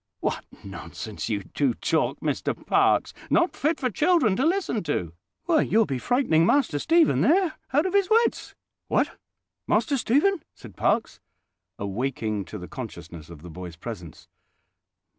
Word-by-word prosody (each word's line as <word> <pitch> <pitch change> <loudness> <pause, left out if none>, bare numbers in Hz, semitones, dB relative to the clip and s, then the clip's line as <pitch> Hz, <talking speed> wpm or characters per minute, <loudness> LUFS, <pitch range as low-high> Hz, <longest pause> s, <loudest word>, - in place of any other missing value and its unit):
"What - - -2 0.2
nonsense - - -7
you - - -1
do - - -1
talk, - - 0
Mr - - -1
Parkes—not 345 - +2
fit 310 +4 0
for 255 -2 -1
children 300 - +3
to 255 - 0
listen 345 - 0
to! 90 - -2 0.3
Why, 320 -2 +3
you'll 225 0 +3
be 135 -6 -3
frightening 240 - +2
Master 205 - +2
Stephen 330 - +3
there 355 +2 +3 0.2
out 295 +5 +3
of 375 - -1
his 400 -2 +3
wits." 455 +2 +2 0.3
"What! - - 0 0.5
Master 280 - +2
Stephen?" 295 - +2
said 115 -5 -13
Parkes, - - 0 0.6
awaking 110 0 -2
to 105 - -8
the 90 -2 -8
consciousness 85 - -9
of 85 -2 -12
the 90 - -9
boy's 90 0 -8
presence. 90 -3 -9
215 Hz, 145 wpm, -25 LUFS, -, 0.6 s, children